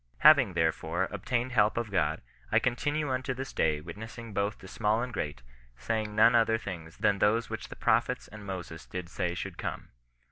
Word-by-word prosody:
Having, 140 Hz, -9 st, +7 dB
therefore, 80 Hz, +2 st, +1 dB
obtained 120 Hz, +5 st, -1 dB
help 110 Hz, -3 st, +3 dB
of 115 Hz, -3 st, -2 dB
God, 80 Hz, -4 st, +1 dB, 0.3 s
I -, -, +4 dB
continue 145 Hz, +5 st, +1 dB
imto 130 Hz, 0 st, -1 dB
this 135 Hz, +1 st, -6 dB
day 75 Hz, -2 st, +2 dB
witnessing 110 Hz, +7 st, -8 dB
both 100 Hz, +1 st, 0 dB
to 95 Hz, -, -12 dB
small 110 Hz, +4 st, +1 dB
and 125 Hz, 0 st, -5 dB
great, 75 Hz, -, -4 dB, 0.3 s
saying 110 Hz, -, -2 dB
none 110 Hz, -, +6 dB
other 115 Hz, -1 st, +4 dB
things 85 Hz, -7 st, -7 dB
than 100 Hz, -1 st, +2 dB
those 110 Hz, +4 st, +2 dB
which -, -, -5 dB
the -, -, -8 dB
prophets -, -, +1 dB
and 110 Hz, 0 st, -11 dB
Moses 90 Hz, -4 st, -6 dB
did 90 Hz, -2 st, -6 dB
say 90 Hz, -1 st, -2 dB
should -, -, -6 dB
come. -, -, -4 dB
105 Hz, 185 wpm, -30 LUFS, 90-115 Hz, 0.3 s, Having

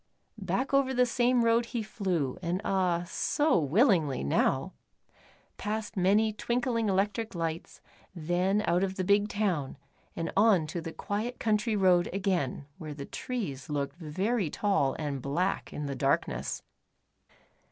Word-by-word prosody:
Back 270 Hz, +1 st, -1 dB
over 270 Hz, -1 st, +3 dB
the 250 Hz, 0 st, +4 dB
same 245 Hz, 0 st, +2 dB
road 230 Hz, +1 st, +3 dB
he 225 Hz, -, -1 dB
flew, 180 Hz, -, -2 dB
and 175 Hz, +1 st, -1 dB
ah, 180 Hz, -3 st, +1 dB
so 295 Hz, -, +1 dB
willingly 160 Hz, -, +2 dB
now. 70 Hz, -, +1 dB, 0.8 s
Past 215 Hz, 0 st, -3 dB
many 205 Hz, +4 st, +3 dB
twinkling 235 Hz, -1 st, 0 dB
electric 205 Hz, +3 st, 0 dB
lights, 165 Hz, -1 st, -4 dB, 0.3 s
then 180 Hz, +5 st, +1 dB
out 175 Hz, +2 st, +2 dB
of 190 Hz, -1 st, -1 dB
the 185 Hz, -, -1 dB
big 205 Hz, +2 st, +3 dB
town, 180 Hz, -12 st, -1 dB, 0.4 s
and 165 Hz, -, -3 dB
on 200 Hz, -5 st, +5 dB
to 165 Hz, +3 st, -4 dB
the 165 Hz, 0 st, -6 dB
quiet 215 Hz, +8 st, -4 dB
country 215 Hz, 0 st, +1 dB
road 180 Hz, -3 st, +4 dB
again 185 Hz, -8 st, -1 dB
where 155 Hz, -3 st, -6 dB
the 140 Hz, -1 st, -6 dB
trees 185 Hz, -, -5 dB
looked 140 Hz, 0 st, -2 dB
very 185 Hz, +5 st, -1 dB
tall 195 Hz, -7 st, +1 dB
and 145 Hz, -4 st, -3 dB
black 170 Hz, +9 st, -1 dB
in 150 Hz, -, -4 dB
the 140 Hz, -1 st, -3 dB
darkness. 135 Hz, +2 st, -1 dB
190 Hz, 140 wpm, -29 LUFS, 160-220 Hz, 0.8 s, on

